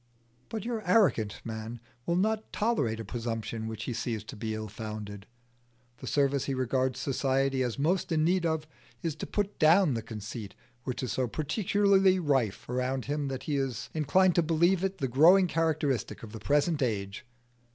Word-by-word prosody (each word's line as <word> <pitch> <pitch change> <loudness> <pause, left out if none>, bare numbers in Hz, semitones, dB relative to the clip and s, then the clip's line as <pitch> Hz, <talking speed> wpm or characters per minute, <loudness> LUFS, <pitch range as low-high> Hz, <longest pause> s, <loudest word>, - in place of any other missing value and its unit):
But 220 -2 -4
your 235 -2 -2
arrogant 170 - +3
man 110 +1 -5 0.3
will 170 - +2
not 215 +4 0
tolerate 145 - 0
a 115 - -5
presumption 115 0 -4
which 110 -1 -5
he 125 - -3
sees 115 -2 -3
to - - -9
be 110 +1 -3
ill 110 0 -4
founded. 105 -1 -7 0.7
The - - -8
service 140 -1 +1
he 135 - -1
regards 130 0 0
society 135 0 0
as 125 -1 -1
most 170 +6 0
in 155 -1 +2
need 180 +2 +2
of 160 -2 0 0.4
is 165 - -1
to - - -5
put 205 -1 -2
down 160 0 +5
the 115 - -2
conceit 110 -1 -7 0.3
which 125 0 -3
is 125 - -2
so 130 -1 0
particularly 190 - +2
rife 135 - 0
around 125 +1 -1
him 145 0 -2
that 135 -1 -4
he 145 -2 -1
is 135 -5 -3
inclined 175 +5 +3
to 175 - +4
believe 170 +3 +2
it 195 0 -1
the 135 - -1
growing 165 +10 +6
characteristic 155 -9 -1
of 110 - -8
the 110 - -7
present 145 +6 +1
age. 105 -3 -2
135 Hz, 180 wpm, -29 LUFS, 115-170 Hz, 0.7 s, growing